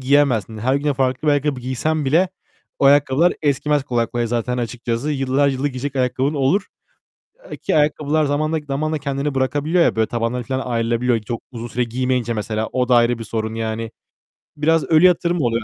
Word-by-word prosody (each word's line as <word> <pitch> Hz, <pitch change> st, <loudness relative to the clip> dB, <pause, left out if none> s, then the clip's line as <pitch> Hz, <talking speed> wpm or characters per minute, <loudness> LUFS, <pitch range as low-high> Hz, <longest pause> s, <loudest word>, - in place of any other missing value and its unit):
giyemezsin. 130 Hz, -6 st, +2 dB
Her 130 Hz, +5 st, +1 dB
güne 145 Hz, 0 st, 0 dB
farklı 130 Hz, +3 st, 0 dB
bir -, -, +5 dB
ayakkabı 145 Hz, -2 st, 0 dB
giysen 145 Hz, +5 st, -1 dB
bile 165 Hz, +7 st, +3 dB, 0.5 s
o -, -, +1 dB
ayakkabılar 145 Hz, +4 st, +4 dB
eskimez 145 Hz, 0 st, +1 dB
kolay 120 Hz, -2 st, 0 dB
kolay 120 Hz, -1 st, -2 dB
zaten 120 Hz, +2 st, -2 dB
açıkçası. 120 Hz, +3 st, -3 dB
Yıllar 135 Hz, 0 st, +1 dB
yılı 135 Hz, +2 st, -1 dB
giyecek 140 Hz, +1 st, -5 dB
ayakkabın 130 Hz, +3 st, 0 dB
olur, 145 Hz, +9 st, +1 dB, 0.8 s
ııı, -, -, -7 dB
ki -, -, -1 dB
ayakkabılar 150 Hz, +1 st, +2 dB
zamanla 155 Hz, +3 st, 0 dB
zamanla 155 Hz, +3 st, -1 dB
kendini 140 Hz, 0 st, -3 dB
bırakabiliyor 145 Hz, +6 st, +1 dB
ya, -, -, +1 dB
böyle 110 Hz, -1 st, +2 dB
tabanları 120 Hz, +1 st, -2 dB
falan 130 Hz, +2 st, -3 dB
ayrılabiliyor 115 Hz, 0 st, 0 dB
çok 115 Hz, +2 st, -5 dB
uzun 115 Hz, 0 st, -6 dB
süre 120 Hz, +1 st, -1 dB
giymeyince 125 Hz, 0 st, -1 dB
mesela, 110 Hz, +1 st, -2 dB
o 125 Hz, -1 st, 0 dB
da 125 Hz, -, +4 dB
ayrı 120 Hz, 0 st, +3 dB
bir 115 Hz, -, -6 dB
sorun 110 Hz, 0 st, -3 dB
yani. 115 Hz, 0 st, -3 dB, 0.7 s
Biraz 160 Hz, +2 st, +2 dB
ölü 160 Hz, +2 st, +4 dB
yatırım 175 Hz, -1 st, +3 dB
oluyor 115 Hz, -3 st, 0 dB
130 Hz, 180 wpm, -20 LUFS, 120-145 Hz, 0.8 s, bir